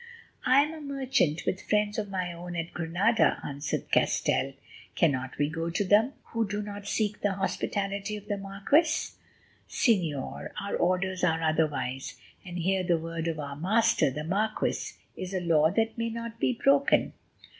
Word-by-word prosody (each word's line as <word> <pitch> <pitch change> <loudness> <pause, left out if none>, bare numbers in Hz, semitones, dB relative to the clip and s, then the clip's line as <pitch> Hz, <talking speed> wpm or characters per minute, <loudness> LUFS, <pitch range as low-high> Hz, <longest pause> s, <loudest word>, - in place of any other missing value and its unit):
"I 270 +2 +6
am 300 +2 -4
a 315 - -8
merchant, 265 - 0
with 190 - -1
friends 210 0 +1
of 205 -1 -3
my 185 -2 -2
own 175 +1 -7
at 165 0 -4
Granada," 180 +7 +2
answered 140 0 -4
Castell. 135 0 +2 0.4
"Cannot 130 -5 +1
we 145 - +2
go 165 +2 -3
to 170 +4 0
them, 215 +7 +4 0.2
who 230 -2 0
do 210 +1 -3
not 205 -1 -7
seek 210 0 -1
the 205 -1 +1
hospitality 200 +1 -2
of 210 0 -12
the 205 -1 -1
marquis?" 250 - +1 0.6
"Señor, 170 - 0
our 200 - -3
orders 185 +1 0
are 165 -2 +2
otherwise, 150 -5 0 0.3
and 180 -2 -7
here 185 +2 +1
the 175 -2 +2
word 165 0 -4
of 160 -2 -2
our 140 -1 -5
master, 215 +5 +3
the 150 +3 -5
marquis, 210 +6 -1 0.2
is 185 +1 -5
a - - +1
law 160 -3 +4
that 225 +4 0
may 230 0 0
not 230 0 -6
be 255 - +2
broken." 275 +3 +3
195 Hz, 165 wpm, -28 LUFS, 165-220 Hz, 0.6 s, I